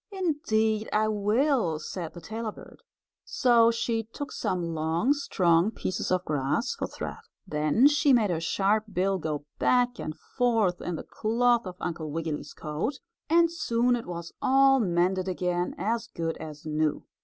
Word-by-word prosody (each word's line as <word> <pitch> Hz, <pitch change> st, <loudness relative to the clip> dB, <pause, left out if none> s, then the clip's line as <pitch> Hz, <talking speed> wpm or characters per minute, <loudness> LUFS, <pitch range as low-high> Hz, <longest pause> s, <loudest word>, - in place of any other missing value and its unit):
"Indeed 220 Hz, -, 0 dB
I 215 Hz, +1 st, +2 dB
will," 215 Hz, -, +1 dB
said 165 Hz, +2 st, -6 dB
the 175 Hz, -, -9 dB
tailor 220 Hz, +5 st, -4 dB
bird. -, -, -14 dB, 0.4 s
So 235 Hz, -3 st, +4 dB
she 230 Hz, -1 st, 0 dB
took 245 Hz, +6 st, -8 dB
some 175 Hz, -2 st, -2 dB
long, 160 Hz, -, +1 dB
strong 180 Hz, -, +2 dB
pieces 185 Hz, -4 st, -3 dB
of 185 Hz, 0 st, 0 dB
grass 150 Hz, -, 0 dB
for -, -, -4 dB
thread. -, -, -6 dB, 0.3 s
Then 155 Hz, -, +2 dB
she 290 Hz, 0 st, +3 dB
made 225 Hz, -6 st, +4 dB
her 165 Hz, -, 0 dB
sharp 200 Hz, +5 st, +1 dB
bill 190 Hz, +1 st, +1 dB
go 150 Hz, -3 st, -3 dB
back 245 Hz, 0 st, +2 dB
and 155 Hz, -, -4 dB
forth 225 Hz, -8 st, 0 dB
in 175 Hz, -, -3 dB
the -, -, -6 dB
cloth 235 Hz, 0 st, +1 dB
of 180 Hz, -, -7 dB
Uncle 165 Hz, -3 st, -4 dB
Wiggily's 160 Hz, 0 st, -4 dB
coat 155 Hz, -, -3 dB, 0.3 s
and 335 Hz, +1 st, +4 dB
soon 245 Hz, -7 st, +1 dB
it 235 Hz, -, -6 dB
was 170 Hz, -1 st, -6 dB
all 270 Hz, 0 st, +5 dB
mended 185 Hz, -2 st, +1 dB
again 180 Hz, -1 st, -1 dB
as 225 Hz, +5 st, -1 dB
good 165 Hz, -7 st, -3 dB
as 155 Hz, -1 st, -9 dB
new. 155 Hz, -1 st, 0 dB
205 Hz, 160 wpm, -27 LUFS, 170-240 Hz, 0.4 s, all